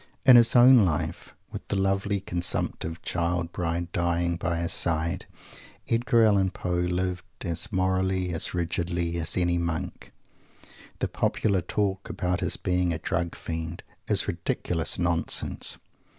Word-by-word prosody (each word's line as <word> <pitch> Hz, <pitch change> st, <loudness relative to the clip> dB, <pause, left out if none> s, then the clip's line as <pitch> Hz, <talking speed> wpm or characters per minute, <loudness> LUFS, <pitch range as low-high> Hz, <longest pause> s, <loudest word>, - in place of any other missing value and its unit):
In 130 Hz, -, +9 dB
his 120 Hz, 0 st, +6 dB
own 125 Hz, -1 st, +8 dB
life 80 Hz, -5 st, -2 dB, 0.2 s
with -, -, -8 dB
that -, -, -2 dB
lovely 100 Hz, +1 st, 0 dB
consumptive 85 Hz, -2 st, -2 dB
Child 85 Hz, 0 st, -1 dB
bride 85 Hz, 0 st, -3 dB
dying 85 Hz, 0 st, 0 dB
by 85 Hz, 0 st, -2 dB
his 85 Hz, -, 0 dB
side 80 Hz, -1 st, 0 dB, 0.6 s
Edgar 120 Hz, 0 st, +3 dB
Allen 100 Hz, -3 st, +3 dB
Poe 95 Hz, -1 st, -5 dB
lived 90 Hz, +1 st, -1 dB, 0.2 s
as 85 Hz, +4 st, -3 dB
"morally," 95 Hz, -1 st, 0 dB
as 80 Hz, -, -2 dB
rigidly, 85 Hz, 0 st, -1 dB
as 80 Hz, +2 st, 0 dB
any 85 Hz, -1 st, +2 dB
Monk. 85 Hz, +2 st, -4 dB, 0.9 s
The -, -, -1 dB
popular 100 Hz, -3 st, 0 dB
talk 95 Hz, +2 st, -2 dB
about 90 Hz, 0 st, -1 dB
his -, -, -1 dB
being 90 Hz, -1 st, 0 dB
a 80 Hz, -, -1 dB
"Drug 85 Hz, +1 st, -2 dB
Fiend" 80 Hz, +1 st, -5 dB, 0.2 s
is -, -, +3 dB
ridiculous 85 Hz, -2 st, -1 dB
nonsense. 85 Hz, -1 st, 0 dB
90 Hz, 135 wpm, -26 LUFS, 85-95 Hz, 0.9 s, In